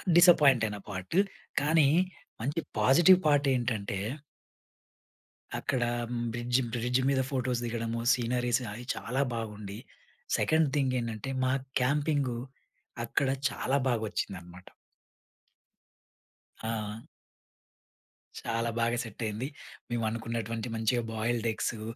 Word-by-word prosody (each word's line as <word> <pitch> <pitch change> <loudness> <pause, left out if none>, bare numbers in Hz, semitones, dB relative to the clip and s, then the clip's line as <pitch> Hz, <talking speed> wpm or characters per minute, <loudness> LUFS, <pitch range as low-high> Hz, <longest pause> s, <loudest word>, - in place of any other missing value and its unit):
డిస్సపాయింటయిన 140 - +6
part. 95 - -3 0.4
కానీ 150 -1 +4 0.5
మంచి 145 +7 -1 0.2
positive 170 - +7
part 145 -1 +4
ఏంటంటే 110 -5 -1 1.6
అక్కడ 130 -4 0 0.5
బ్రిడ్జ్, 120 +2 +1
బ్రిడ్జ్ 125 +2 +1
మీద 135 -1 +3
ఫోటోస్ 125 -2 0
దిగడము. 115 0 -2
సీనరీస్ 120 0 +1
అవి 120 +2 -8
చాలా 115 +7 -2
బాగుండి. 105 -2 -5 0.6
సెకండ్ 160 -2 +3
థింగ్ 130 -2 +1
ఏంటంటే 115 +2 -4
మా 130 0 +2 0.3
క్యాంపింగు 140 -2 +1 0.7
అక్కడ 135 +3 +1 0.2
చాలా 135 +2 0
బాగొచ్చిందనమాట. 95 -6 -3 2.0
ఆ! 110 -1 -4 1.4
చాలా 115 0 -1
బాగా 115 +1 +1
సెట్ 115 0 -10
అయింది. 110 +5 -2 0.4
మేమనుకున్నటువంటి 115 0 -2
మంచిగా 115 +2 +1
బాయిల్డ్ 115 +1 0
ఎగ్సు, 110 0 -3
120 Hz, 95 wpm, -30 LUFS, 110-130 Hz, 2.0 s, positive